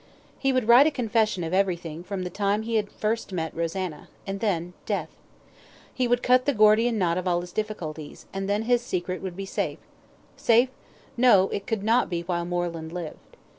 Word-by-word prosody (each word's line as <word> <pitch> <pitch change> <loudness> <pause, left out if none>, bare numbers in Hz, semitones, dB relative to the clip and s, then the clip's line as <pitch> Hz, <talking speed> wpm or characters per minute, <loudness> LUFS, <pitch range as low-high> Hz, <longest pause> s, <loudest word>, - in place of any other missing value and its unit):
He 270 - +2
would 255 -4 0
write 245 +5 +8
a - - +5
confession 225 - 0
of 165 +2 -4
everything 175 -4 -1
from 190 0 -4
the 180 - -5
time 205 +2 0
he 225 0 0
had 205 -2 -1
first 220 0 -2
met 165 -3 -3
Rosanna, 170 -1 -3 0.2
and 195 0 -4
then 180 -5 -1
death. - - -1 0.8
He 255 -2 0
would 245 0 +1
cut 255 0 +4
the 285 - +2
Gordian 215 +2 +4
knot 175 -3 +1
of 185 - -4
all 175 -1 +2
his 175 0 -9
difficulties, 170 -8 -5
and 195 0 -3
then 205 +2 +1
his 240 +1 +2
secret 185 -5 -3
would 185 -2 -5
be 195 +1 -5
safe; 190 - -2 0.6
safe? 240 +2 +4 0.5
no, 220 -6 +5
it 200 - -4
could 220 -4 -1
not 230 +3 +3
be 170 -2 -2
while 170 -1 -2
Moreland 170 -2 -3
lived. 170 -3 -8
195 Hz, 195 wpm, -26 LUFS, 175-225 Hz, 0.8 s, write